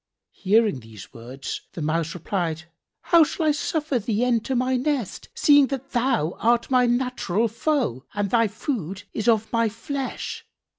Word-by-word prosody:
Hearing 210 - +2
these 110 -4 -13
words 125 +4 -7
the 170 - -6
Mouse 165 +2 -1
replied, 170 -3 -2 0.4
"How 340 -2 +6
shall 315 +2 -2
I 305 - +5
suffer 295 -2 -1
thee 220 +2 0
enter 245 +1 0
my 255 +1 +1
nest 255 - -2
seeing 290 -2 +5
that 270 0 -5
thou 240 - 0
art 235 +2 +2
my 250 -1 +4
natural 240 -4 0
foe 230 - -1
and 205 -1 -1
thy 230 -2 +4
food 200 - -4
is 220 - -3
of 225 -1 +2
my 230 -1 +2
flesh? 265 +5 -5
230 Hz, 155 wpm, -24 LUFS, 185-260 Hz, 0.4 s, How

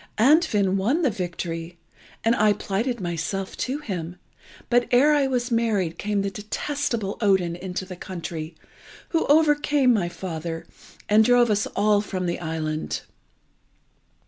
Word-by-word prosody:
Andfind 215 - +4
won 255 - +1
the 270 - +3
victory, 175 -3 -5 0.5
and 230 +1 +3
I 210 -1 +4
plighted 220 +5 -2
myself 180 +2 -3
to 260 +3 -2
him; 180 - -5 0.5
but 240 0 +2
ere 270 +5 +5
I 285 -2 +3
was 250 -1 -1
married 215 -8 0
came 205 -1 0
the 200 - -2
detestable 220 0 -3
Odin 190 -5 +2
into 185 +1 -5
the 185 -1 -8
country, 170 -3 -6 0.5
who 330 - 0
overcame 295 -3 +4
my 185 -6 0
father, 165 -2 -5 0.4
and 215 +1 +5
drove 240 0 +4
us 205 0 +1
all 210 -1 +3
from 185 -3 -4
the 170 0 -2
island. 155 -2 -3
205 Hz, 140 wpm, -24 LUFS, 175-245 Hz, 0.5 s, ere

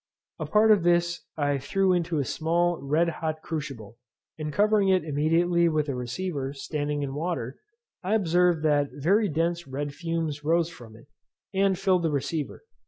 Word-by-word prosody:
A - - -3
part 215 +1 +4
of 210 -4 +5
this 175 0 +2 0.2
I 145 -2 +1
threw 190 +7 +1
into 170 -2 0
a 140 - 0
small 170 +3 0
red 150 +5 +1
hot 155 -1 -3
crucible; 130 -8 -6 0.4
and 155 -1 -4
covering 205 +2 +3
it 185 -2 +3
immediately 165 +3 +2
with 155 -2 0
a - - 0
receiver, 135 +3 -3
standing 145 +1 -3
in 135 -1 -4
water, 145 -5 -3 0.4
I 195 +4 0
observed 175 -4 +2
that 145 -2 +2
very 195 +8 +2
dense 170 +2 -1
red 140 +2 -4
fumes 160 -1 -3
rose 165 +2 +1
from 115 -7 -13
it, 115 - -16 0.5
and 195 -1 +2
filled 190 -2 +2
the 165 - +1
receiver. 150 - -3
165 Hz, 170 wpm, -26 LUFS, 145-175 Hz, 0.5 s, of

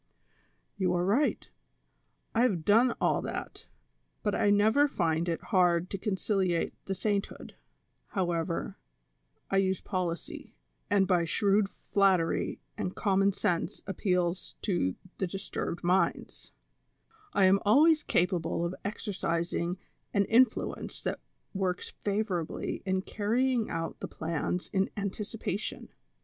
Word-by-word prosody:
'' - - -42
You 180 -1 +2
are 175 0 +1
right, 245 +10 +1 0.9
I 235 +2 +4
liave 175 -8 -3
done 230 +4 +5
all - - +2
that, - - -6 0.6
but 210 - +1
I 205 - +2
never 220 +8 +5
find 170 - 0
it 165 - -2
hard 175 -2 +3
to 195 - -3
conciliate 190 -4 0
the 195 - -2
sainthood; 200 +1 -2 0.5
however, 175 -1 -2 0.7
I 195 - +3
use 190 -1 +2
policy, 180 -3 -4 0.3
and 200 -2 +4
by 175 -3 +3
shrewd 200 +3 +2
flattery 190 -6 +1 0.2
and 180 - -3
common 195 -1 +3
sense 175 -1 -1
appeals 180 -2 -1
to 175 - 0 0.2
the 190 - 0
disturbed 190 -2 -4
minds, 175 0 0 0.8
I 195 - +4
am 190 +1 +5
always 305 +9 +5
capable 175 - 0
of 170 - -2
exercising 175 -3 -2 0.4
an 200 0 +4
in 240 +5 +7
fluence 230 - -6
that - - -2 0.3
works 190 -2 -2
favorably 200 -5 -2
in 190 0 +1
carrying 230 +4 0
out 165 0 -4
the - - -4
plans 165 +2 -3
in 195 -1 +2
anticipation. 205 0 -4
190 Hz, 125 wpm, -30 LUFS, 175-205 Hz, 0.9 s, in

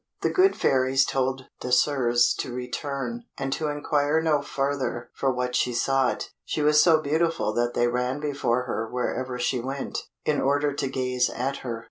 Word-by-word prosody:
The - - +1
good 380 +1 +4
fairies 130 +1 +3
told 130 0 -1 0.2
Désirs 125 -1 +3
to 125 - -3
return, 140 - -4
and 135 0 -2
to 155 - -2
inquire 145 +1 +1
no 155 -3 +2
further 135 -4 -2
for 135 - 0
what 125 0 -2
she 125 - +1
sought. 135 +1 +1
She 150 - -2
was 150 0 +5
so 160 -2 +5
beautiful 160 -4 0
that 120 +1 0
they 120 - +3
ran 125 +3 -1
before 140 -4 0
her 115 -2 -3
wherever 125 0 -2
she 125 +1 0
went, 135 +3 -4 0.3
in 150 - +1
order 145 +1 +1
to 140 - -2
gaze 125 -1 0
at 135 +3 -2
her. 120 -3 -5
135 Hz, 170 wpm, -25 LUFS, 125-145 Hz, 0.3 s, was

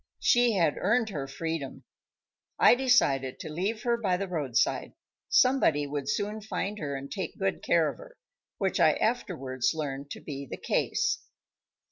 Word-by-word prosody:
She 240 -1 +4
had 170 -7 +2
earned 220 +3 +2
her 145 -8 -4
freedom. 150 0 -5 0.7
I - - +7
decided 245 - +2
to 155 - -6
leave 200 +8 -2
her 235 -1 +2
by 190 -6 0
the 195 +1 -3
roadside. 150 -9 0 0.4
Somebody 205 - +4
would 145 -1 -4
soon 210 +1 -2
find 210 0 -3
her, 140 -4 -3
and 140 0 -7
take - - -4
good - - -1
care - - +3
of - - -4
her; - - -14 0.4
which 190 -2 0
I 160 -3 +6
afterwards 135 - -1
learned 140 -2 -4
to - - -7
be 140 -2 -7
the - - -5
case. 435 0 0
170 Hz, 160 wpm, -28 LUFS, 140-220 Hz, 0.7 s, I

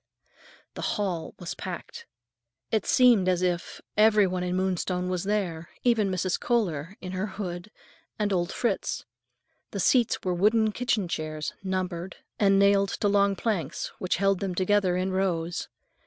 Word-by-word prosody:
The - - -7 0.2
hall 180 -6 -2
was 175 -1 -5
packed. 180 -3 -7 0.6
It 220 -3 0
seemed 235 -7 +5
as 180 0 +1
if 175 -1 -2
every 210 -1 +5
one 185 -1 -2
in 180 0 -1
Moonstone 185 -1 -1
was 180 0 -2
there, 180 -6 -1
even 230 -5 +3
Mrs. 185 -1 -1
Kohler, 185 -8 -1
in 185 - -6
her 185 +3 -2
hood, 190 -2 -6 0.5
and 205 -2 0
old 175 -1 0
Fritz. 225 -6 -1 0.6
The - - -5
seats 240 -3 +3
were 185 - 0
wooden 215 +4 +3
kitchen 220 -4 0
chairs, 155 -2 -4
numbered, 185 -2 -3 0.2
and 195 -1 +4
nailed 200 0 +4
to 205 - -1
long 200 0 +3
planks 180 - -2
which 185 - 0
held 195 0 +2
them 190 -3 -3
together 185 -1 +2
in 185 +1 -1
rows. 175 -3 -1
190 Hz, 155 wpm, -27 LUFS, 180-205 Hz, 0.6 s, seemed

